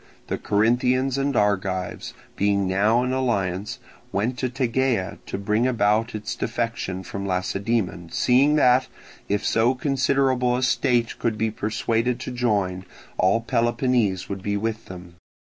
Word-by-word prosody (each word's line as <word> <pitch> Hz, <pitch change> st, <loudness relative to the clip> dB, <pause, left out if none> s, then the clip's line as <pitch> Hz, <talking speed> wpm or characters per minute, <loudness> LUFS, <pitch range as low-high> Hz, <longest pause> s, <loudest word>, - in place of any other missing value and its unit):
The -, -, -2 dB
Corinthians 125 Hz, +5 st, +1 dB
and 140 Hz, -1 st, 0 dB
Argives, 95 Hz, -3 st, -1 dB, 0.2 s
being 100 Hz, -1 st, +1 dB
now 105 Hz, +6 st, +2 dB
in 125 Hz, +1 st, -1 dB
alliance, 105 Hz, -3 st, -1 dB, 0.3 s
went 110 Hz, +6 st, -1 dB
to 130 Hz, -, 0 dB
Tegea 125 Hz, -5 st, -1 dB
to -, -, -4 dB
bring 105 Hz, +4 st, +1 dB
about 110 Hz, -1 st, +1 dB
its 105 Hz, -1 st, -4 dB
defection 115 Hz, -6 st, -3 dB
from 100 Hz, +1 st, -6 dB
Lacedaemon, 95 Hz, -1 st, -1 dB
seeing 135 Hz, +4 st, +3 dB
that, 130 Hz, -3 st, +4 dB, 0.4 s
if 100 Hz, +1 st, 0 dB
so 120 Hz, +3 st, +2 dB
considerable 130 Hz, -2 st, +1 dB
a 130 Hz, -, -2 dB
state 125 Hz, -2 st, +1 dB
could 115 Hz, -2 st, -1 dB
be 110 Hz, +1 st, 0 dB
persuaded 115 Hz, +3 st, -1 dB
to -, -, -5 dB
join, 100 Hz, -7 st, 0 dB, 0.4 s
all 95 Hz, +5 st, +3 dB
Peloponnese 120 Hz, -4 st, +1 dB
would 100 Hz, -1 st, -5 dB
be 100 Hz, +1 st, -1 dB
with 110 Hz, +1 st, -3 dB
them. 90 Hz, -2 st, -11 dB
115 Hz, 140 wpm, -24 LUFS, 100-125 Hz, 0.4 s, that